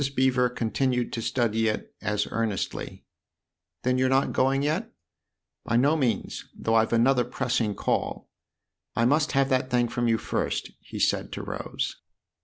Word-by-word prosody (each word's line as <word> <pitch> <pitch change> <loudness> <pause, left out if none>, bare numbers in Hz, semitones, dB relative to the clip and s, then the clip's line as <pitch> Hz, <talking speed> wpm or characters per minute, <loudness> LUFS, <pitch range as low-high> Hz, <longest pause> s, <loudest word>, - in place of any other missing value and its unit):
Mrs. 140 0 -3
Beever 125 -1 +3
continued 125 +1 -1
to 115 - -2
study 115 -2 +1
it 110 - -3
as 105 0 0
earnestly. 115 -4 -3 0.4
" 85 +1 -57
Then 125 0 +2
you're 130 0 +3
not 135 +1 +2
going 135 +2 +2
yet? 160 +10 -1 0.2
" - - -59
" - - -61
By 115 - +1
no 140 +6 +4
means, 125 -9 -1
though 115 - -1
I've 110 0 +3
another 125 +2 +4
pressing 120 -4 -1
call. - - -1 0.7
I 115 - +2
must 150 +5 +2
have 135 -1 +3
that 130 -1 +1
thing 120 -1 +2
from 120 +1 0
you 115 -1 +3
first," - - -2
he - - -9
said - - +1
to - - -5
Rose. - - -4
125 Hz, 175 wpm, -26 LUFS, 115-135 Hz, 0.7 s, no